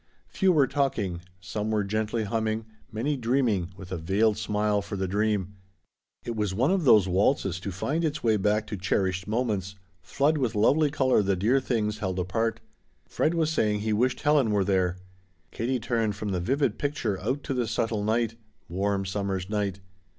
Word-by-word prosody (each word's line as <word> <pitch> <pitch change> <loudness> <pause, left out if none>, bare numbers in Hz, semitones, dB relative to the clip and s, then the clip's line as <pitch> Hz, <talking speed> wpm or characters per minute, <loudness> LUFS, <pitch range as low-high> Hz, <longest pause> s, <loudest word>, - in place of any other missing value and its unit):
Few 190 -2 +2
were 150 -5 +4
talking; 110 -11 -1 0.2
some 105 +3 -4
were 105 -1 +1
gently 110 +2 -1
humming, 110 +1 -1 0.3
many 120 +8 -1
dreaming 115 -8 0
with 95 -1 -10
a 95 - -2
veiled 100 +6 +2
smile 105 -1 0
for 100 - -6
the 95 -1 -2
dream. 100 0 0 0.7
It 120 - -3
was 105 -3 -1
one 130 - +2
of 190 -4 +1
those 105 -7 +6
waltzes 95 0 +1
to 100 +1 -5
find 145 - -2
its 150 -2 -2
way 110 -2 +3
back 105 +2 +1
to 105 -1 -5
cherished 95 0 -1
moments, 105 -4 -1 0.3
flood 150 +2 +1
with 125 -6 -1
lovely 145 +9 +4
color 130 -5 +2
the 100 -1 +1
dear 110 +9 +2
things 110 -5 -1
held 95 -3 -2
apart. 110 +5 -1 0.5
Fred 160 +2 0
was 160 -1 +1
saying 105 -8 +1
he 110 0 0
wished 125 +4 +1
Helen 145 -5 +3
were 100 -2 +2
there. 95 -2 +1 0.5
Katie 125 +2 -1
turned 110 -2 -1
from 105 0 -4
the 95 -2 -1
vivid 135 - 0
picture 145 -9 -1
out 130 +8 -2
to 140 - -2
the 125 -3 -1
subtle 110 -1 -1
night 115 +1 +1 0.3
warm 95 +2 -1
summer's 95 0 -3
night. 100 -3 -1
105 Hz, 180 wpm, -27 LUFS, 100-125 Hz, 0.7 s, those